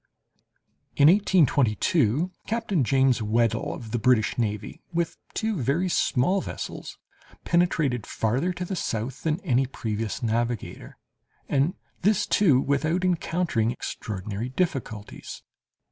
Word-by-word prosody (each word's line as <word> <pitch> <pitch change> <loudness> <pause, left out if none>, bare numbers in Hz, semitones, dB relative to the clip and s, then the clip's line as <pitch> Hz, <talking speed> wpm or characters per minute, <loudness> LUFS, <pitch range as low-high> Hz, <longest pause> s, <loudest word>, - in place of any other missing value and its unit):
In 145 +2 +7
1822, 155 - +3 0.2
Captain 215 - 0
James 130 -1 +3
Weddell, 115 +1 +1
of 115 -4 -9
the 120 - 0
British 115 -2 +3
navy, 105 -3 -3
with 170 -1 -1 0.2
two 220 -8 -1
very 155 +9 +1
small 180 +5 +2
vessels, - - -6 0.5
penetrated 155 - +1
farther 125 +11 0
to 180 0 -4
the 190 - -3
south 120 -3 -3
than 160 +1 0
any 135 -6 +1
previous 110 -1 -4
navigator, 115 +1 -2 0.5
and 145 +7 +1 0.3
this, 210 +3 +3
too, 155 -11 +4
without 155 +7 0
encountering 170 -9 0
extraordinary 105 -1 -4
difficulties. 130 - -4
135 Hz, 115 wpm, -26 LUFS, 115-175 Hz, 0.5 s, In